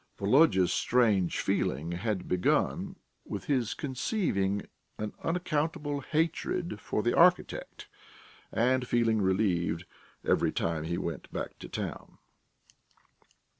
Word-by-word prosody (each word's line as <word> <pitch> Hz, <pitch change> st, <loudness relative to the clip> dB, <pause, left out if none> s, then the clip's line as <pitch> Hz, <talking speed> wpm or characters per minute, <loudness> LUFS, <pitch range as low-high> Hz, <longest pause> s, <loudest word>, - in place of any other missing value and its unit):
Volodya's 100 Hz, -, +4 dB
strange 110 Hz, -8 st, +2 dB
feeling 80 Hz, +6 st, 0 dB
had 95 Hz, +2 st, -2 dB
begun 90 Hz, 0 st, +1 dB, 0.3 s
with -, -, -6 dB
his 125 Hz, -6 st, 0 dB
conceiving 125 Hz, -, -1 dB, 0.3 s
an 105 Hz, -1 st, -4 dB
unaccountable 155 Hz, -4 st, -1 dB
hatred 165 Hz, +4 st, -1 dB
for 105 Hz, -, -1 dB
the 120 Hz, -, +2 dB
architect, 180 Hz, +1 st, +2 dB, 0.6 s
and 125 Hz, +2 st, +2 dB
feeling 115 Hz, -3 st, +2 dB
relieved 95 Hz, -3 st, +1 dB, 0.4 s
every -, -, +2 dB
time 80 Hz, -2 st, -1 dB
he 85 Hz, +2 st, -2 dB
went 85 Hz, -5 st, -5 dB
back -, -, -5 dB
to -, -, -9 dB
town. -, -, -6 dB
110 Hz, 105 wpm, -30 LUFS, 95-145 Hz, 0.6 s, Volodya's